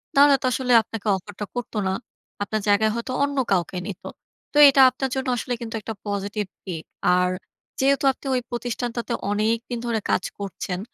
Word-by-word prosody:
তাহলে 280 0 +7
তো - - -3
আসলে 255 0 -1
আপনাকে 220 -1 -7
অফার 190 +2 -8
টা 210 - -2
করত 245 -1 -4
না। 190 - +1 0.5
আপনার 215 +1 -2
জায়গায় 210 +1 +4
হয়তো 235 +2 -4
অন্য 280 0 -1
কাউকে 180 -1 +1
নিতো। 195 -2 -7 0.5
তো - - 0
এটা 275 0 +5
আপনার 265 +1 -3
জন্য 265 0 -2
আসলে 245 +2 -2
কিন্তু 230 -1 -5
একটা 225 - -5
পজিটিভ 205 +1 -2 0.2
দিক। 170 -5 -5 0.3
আর 180 0 +2 0.5
যেহেতু 275 +1 +3
আপনি 265 - -16
ওই 250 - +1
প্রতিষ্ঠানটাতে 240 0 -3 0.2
অনেকদিন 225 +3 0
ধরে 230 -2 0
কাজ - - +2 0.2
করছেন। 190 -2 -4
225 Hz, 175 wpm, -24 LUFS, 205-250 Hz, 0.5 s, তাহলে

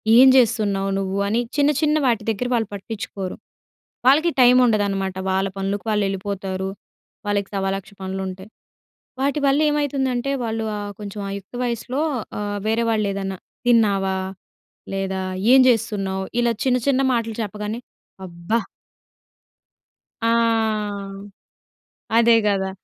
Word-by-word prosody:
ఏం 260 +3 +9
జేస్తున్నావు 210 -5 +2
నువ్వు 195 0 -2
అని 225 +3 +1 0.2
చిన్న, 290 0 +4
చిన్న 305 0 +3
వాటి 230 -4 +2
దగ్గర 225 +3 -1
వాళ్ళు 225 -3 +1
పట్టిచ్చుకోరు. 200 -2 -5 0.7
వాళ్ళకి 305 +6 +5
టైముండదనమాట. 215 -6 +4 0.2
వాళ్ళ 190 +1 +1
పనులకు 195 +2 -2
వాళ్ళెలిపోతారు. 195 -2 -2 0.6
వాళ్ళకి 205 -1 -1
సవాలక్ష 195 0 -2
పనులుంటాయి. 190 +1 -5 0.7
వాటి 280 +2 +1
వల్ల 275 +2 +3
ఏమైతుందంటే, 275 -3 0
వాళ్ళు 225 -1 -2
ఆహ్, 205 0 -5
కొంచెం 205 0 -7
ఆ - - -4
యుక్త 200 +5 -12
వయసులో 245 +3 -2 0.4
ఆహ్, 205 0 -3
వేరేవాళేదన్నా, 210 -4 0 0.3
తిన్నావా, 200 -5 +3 0.8
లేదా 190 -1 -2 0.3
ఏం 265 - +8
జేస్తున్నావు 195 -5 +1 0.2
ఇలా 240 -1 +3
చిన్న 250 -1 +3
చిన్న 270 -1 +3
మాటలు 230 -2 -1
చెప్పగానే, 210 +2 -4 0.5
అబ్బ! 170 0 -14 1.7
ఆ! 230 - +3 1.9
అదేగదా! 210 -4 +4
210 Hz, 110 wpm, -22 LUFS, 195-240 Hz, 1.9 s, ఏం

